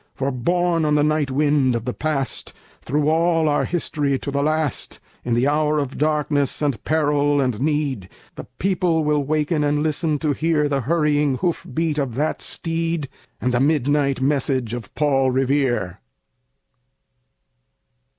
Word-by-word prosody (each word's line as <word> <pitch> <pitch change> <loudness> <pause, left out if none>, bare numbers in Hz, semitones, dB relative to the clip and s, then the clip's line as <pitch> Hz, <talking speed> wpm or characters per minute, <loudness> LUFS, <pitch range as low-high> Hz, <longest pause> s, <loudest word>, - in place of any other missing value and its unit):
For, 135 +1 -1
borne 170 +6 0
on 150 -1 +2
the 145 - +3
night 150 -2 +1
wind 140 -2 +2
of 115 -1 -3
the 125 - -2
Past, 150 -4 -3 0.3
Through 145 +3 0
all 165 0 +2
our 145 - +1
history, 150 -5 -1
to 140 - -5
the 140 0 0
last, 155 -1 -1 0.2
In 120 -1 0
the 120 +3 +2
hour 150 +1 +1
of 140 -3 -3
darkness 150 -2 0
and 140 -6 -1
peril 145 -2 +1
and 125 -5 -1
need, 140 -10 -1 0.2
The - - -9
people 180 -4 +1
will 150 -1 +1
waken 150 +2 0
and 145 0 +1
listen 155 0 0
to 150 0 0
hear 155 0 +1
The 140 -1 0
hurrying 150 -1 +1
hoof 175 +1 -2
beats 160 -2 -1
of 130 -5 -2
that 150 +4 -1
steed, 165 -3 -2 0.3
And 125 - -1
the 120 - +2
midnight 145 -1 +1
message 130 -4 0
of 120 -4 -6
Paul 135 -3 +2
Revere. 130 -7 0
145 Hz, 155 wpm, -21 LUFS, 135-155 Hz, 0.3 s, the